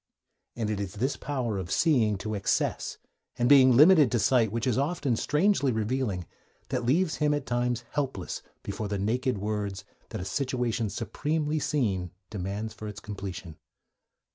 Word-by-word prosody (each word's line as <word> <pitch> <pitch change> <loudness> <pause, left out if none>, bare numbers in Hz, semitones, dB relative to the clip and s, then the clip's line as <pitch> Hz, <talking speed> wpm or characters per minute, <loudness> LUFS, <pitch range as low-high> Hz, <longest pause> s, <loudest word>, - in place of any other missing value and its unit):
And 110 -3 -2
it 105 - -2
is 100 -1 -4
this 130 +7 0
power 125 -8 -2
of 90 -2 -5
seeing 115 - +3
to 110 - -2
excess, 100 -2 -1 0.4
and 120 - +2
being 130 -3 +7
limited 155 -3 +7
to 120 - +2
sight 115 0 +3
which 115 +1 -2
is 125 -4 +2
often 140 -2 0
strangely 150 - +2
revealing, 110 -4 -1 0.4
that 125 -2 -1
leaves 155 +8 +2
him 150 -1 +2
at 145 -2 -3
times 120 0 -1
helpless 135 -10 -3 0.2
before 110 - -4
the 100 0 -2
naked 120 +4 0
words 100 -1 -3 0.2
that - - -5
a 90 - -5
situation 125 -2 -1
supremely 150 +8 -1
seen 105 - 0 0.2
demands 105 +2 -4
for 110 -1 -8
its 105 -1 -7
completion. 95 -6 -7
120 Hz, 160 wpm, -28 LUFS, 105-135 Hz, 0.4 s, being